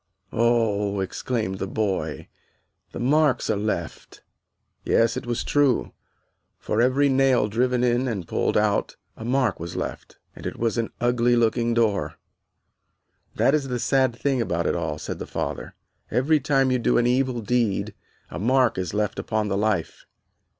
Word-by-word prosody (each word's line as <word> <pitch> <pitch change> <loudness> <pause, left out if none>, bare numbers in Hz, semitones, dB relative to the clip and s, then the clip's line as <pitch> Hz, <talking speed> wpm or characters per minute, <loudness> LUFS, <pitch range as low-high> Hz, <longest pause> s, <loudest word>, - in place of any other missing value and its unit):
"Oh," 110 -4 +1
exclaimed 95 0 -3
the 95 - -3
boy, 100 -2 -2 0.6
"the - - -7
marks 140 -1 +2
are - - +1
left." 105 +2 -4 0.6
Yes, 115 +1 +2
it 125 - -5
was 120 -1 -1
true, 145 -4 +2 0.7
for 110 - -1
every 130 +3 +3
nail 135 -4 +3
driven 125 +3 +1
in 125 +1 +2
and 100 -8 -3
pulled - - 0
out - - +1 0.2
a - - -9
mark 125 -3 0
was 85 +1 -6
left, - - -6 0.2
and - - -7
it - - -6
was 115 0 0
an 115 - -1
ugly 120 0 +2
looking 115 0 +1
door. 110 -4 +1 1.2
"That 135 - +3
is 145 -3 +1
the 125 -1 -2
sad 130 0 +1
thing 135 0 0
about 85 -6 -1
it - - +1
all," 75 - -2
said - - -6
the - - -6
father, - - -4 0.3
"every 145 +6 +2
time 135 -2 +2
you 125 - +2
do - - +2
an 120 - +3
evil 125 0 +1
deed 115 -2 0 0.4
a - - -5
mark 125 +1 +2
is 90 +1 -3
left 105 0 -1
upon 110 -1 -1
the 95 - 0
life. 105 -5 -1
120 Hz, 165 wpm, -24 LUFS, 105-130 Hz, 1.2 s, every